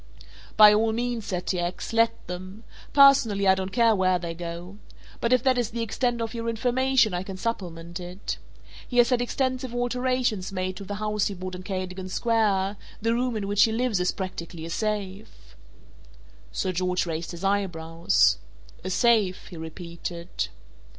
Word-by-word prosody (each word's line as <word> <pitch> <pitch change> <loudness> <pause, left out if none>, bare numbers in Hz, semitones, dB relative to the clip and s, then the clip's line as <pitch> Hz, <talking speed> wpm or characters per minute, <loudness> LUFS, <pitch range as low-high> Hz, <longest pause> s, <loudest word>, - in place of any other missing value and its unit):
"By 210 -1 +10
all 220 +1 +2
means," 240 -1 -2
said 180 -1 -3
T. 180 - -1
X., 175 +5 -3
"let 230 0 +2
them. 185 +4 -7 0.3
Personally, 255 -8 +6
I 190 - +7
don't 190 0 -3
care 230 0 +4
where 185 -1 +3
they 170 -1 -5
go. 175 +3 -7 0.4
But 235 - 0
if 255 -1 +4
that 255 -2 +3
is 235 -3 0
the 230 0 -3
extent 240 +1 -1
of 225 -1 -3
your 230 -1 -3
information 250 -1 +2
I 175 - -1
can 190 0 -7
supplement 175 -6 -4
it. 180 +2 -5 0.5
He 245 - -4
has 240 +1 +5
had 245 -1 +3
extensive 255 0 -1
alterations 245 -5 0
made 185 -1 -2
to 200 - -7
the 205 - -4
house 210 0 0
he 200 - -4
bought 185 0 -6
in 180 - -6
Cadogan 185 -1 -4
Square; 205 -3 +1 0.2
the 230 +1 +1
room 245 -1 0
in 200 -2 -3
which 205 0 +2
he 225 - -1
lives 230 -3 0
is 180 - +1
practically 170 -3 -6
a 165 - -6
safe." 195 - -4 1.0
Sir 185 - -1
George 180 0 0
raised 165 0 -4
his 170 +1 -8
eyebrows. 165 - +2 0.4
"A 185 - -3
safe," 210 -3 +2
he 180 - -10
repeated. 170 - -5
200 Hz, 175 wpm, -26 LUFS, 180-230 Hz, 1.0 s, By